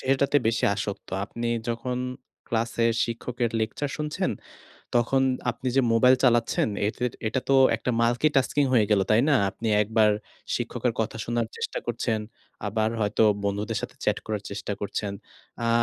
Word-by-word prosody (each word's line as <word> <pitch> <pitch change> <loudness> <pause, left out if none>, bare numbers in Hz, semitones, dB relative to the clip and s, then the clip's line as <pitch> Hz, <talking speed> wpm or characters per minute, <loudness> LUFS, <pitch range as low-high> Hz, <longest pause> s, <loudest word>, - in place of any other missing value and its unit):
সেটাতে 135 +2 +2
বেশি 115 +1 +1
আসক্ত। 100 0 -5 0.2
আপনি 115 +3 -5 0.2
যখন 120 +2 -2 0.6
ক্লাসের 115 0 +1
শিক্ষকের 120 0 -3
লেকচার 135 +6 -2
শুনছেন, 150 0 -1 0.6
তখন 120 +3 +3 0.3
আপনি 130 -1 -4
যে 135 - +7
মোবাইল 125 +3 +6
চালাচ্ছেন 120 -2 +3 0.2
এতো 110 - -4 0.3
এটা 130 - -1
তো 135 - +4 0.2
একটা 125 - -2
মাল্টিটাস্কিং 135 +4 +2
হয়ে 110 -4 +5
গেল। 105 - +4
তাই 110 - +5
না? 145 - +5 0.2
আপনি 115 +2 -4
একবার 110 0 +3 0.4
শিক্ষকের - - -1
কথা - - -2
শোনার 120 -1 -1
চেষ্টা - - -3
করছেন। 115 -2 -1 0.5
আবার 110 +1 +1
হয়তো 105 +1 +1 0.2
বন্ধুদের 105 +3 -1
সাথে - - -6
চ্যাট - - +2
করার 105 -2 -2
চেষ্টা 100 0 -4
করছেন। 100 0 -3 0.5
আ - - +1
115 Hz, 150 wpm, -26 LUFS, 110-125 Hz, 0.6 s, যে